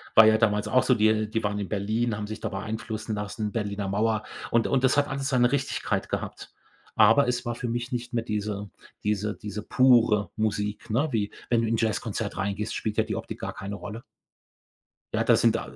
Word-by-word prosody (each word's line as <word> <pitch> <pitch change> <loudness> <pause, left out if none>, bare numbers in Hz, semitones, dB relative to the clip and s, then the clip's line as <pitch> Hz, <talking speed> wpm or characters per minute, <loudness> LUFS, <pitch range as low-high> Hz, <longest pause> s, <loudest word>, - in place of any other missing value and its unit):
war 110 - +10
ja 110 0 +6
damals 105 -2 +2
auch 130 - +3
so. 125 - +3
Die 110 0 +4
äh, 110 -1 +1
die 110 +1 -2
waren 105 0 -1
in 100 - -4
Berlin, 110 +3 0
haben 105 0 -4
sich 110 +1 -6
da - - -3
beeinflussen 110 +2 -4
lassen, 105 0 -3
Berliner 100 -3 -2
Mauer. 110 +1 +1 0.3
Und 115 -1 +3
und 135 -2 +1
das 130 +1 +3
hat 145 0 +3
alles 140 0 -2
seine 125 -1 +3
Richtigkeit 135 -1 -1
gehabt. - - -5 0.4
Aber 115 +5 +6
es 120 0 -1
war 120 0 -2
für 120 -1 -4
mich 120 +1 -3
nicht 120 0 -4
mehr 115 -1 0
diese 105 -2 -3 0.3
diese 105 0 0
diese 105 0 -6
pure 115 -7 +4
Musik, 105 0 -2
ne? 125 +8 +2
Wie 105 -4 -1 0.2
wenn 120 -1 +3
du 115 - 0
in 115 - +1
'n - - -1
Jazzkonzert 110 -3 -2
reingehst, 100 +2 -2
spielt 105 -1 -3
ja - - +4
die - - -4
Optik - - -6
gar - - -4
keine 100 +1 -6
Rolle. 105 +3 -8 1.1
Ja, - - +2
da - - +5
sind, - - +3
äh, - - -1
110 Hz, 215 wpm, -26 LUFS, 105-120 Hz, 1.1 s, war